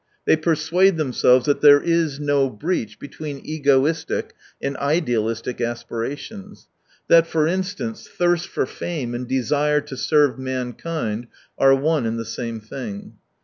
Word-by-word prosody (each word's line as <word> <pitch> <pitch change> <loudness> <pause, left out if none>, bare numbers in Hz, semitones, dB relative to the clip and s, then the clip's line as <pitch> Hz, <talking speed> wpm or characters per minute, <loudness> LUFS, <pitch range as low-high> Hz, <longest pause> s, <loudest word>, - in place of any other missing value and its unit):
They - - +5
persuade 165 +3 +2
themselves 130 -3 +3
that 145 -1 +1
there 145 -1 +8
is 165 -3 0
no 145 -2 +2
breach 130 - -3
between 145 0 -7
egoistic 145 +1 0 0.3
and 140 0 -3
idealistic 120 -6 -1
aspira 120 +2 -3
tions; 205 +3 -11 0.4
that, 165 0 +6
for 160 -2 +1
instance, 190 +6 -3
thirst 175 -1 0
for - - -1
fame 135 -4 -5
and 120 +1 -4
desire 145 +4 +1
to 135 - -9
serve 145 -1 +2
mankind 125 -2 -4 0.3
are 135 0 +5
one 145 -2 +1
and 115 +1 -2
the 115 - -4
same 115 -1 -5
thing. 110 -2 -8
145 Hz, 140 wpm, -22 LUFS, 125-160 Hz, 0.4 s, there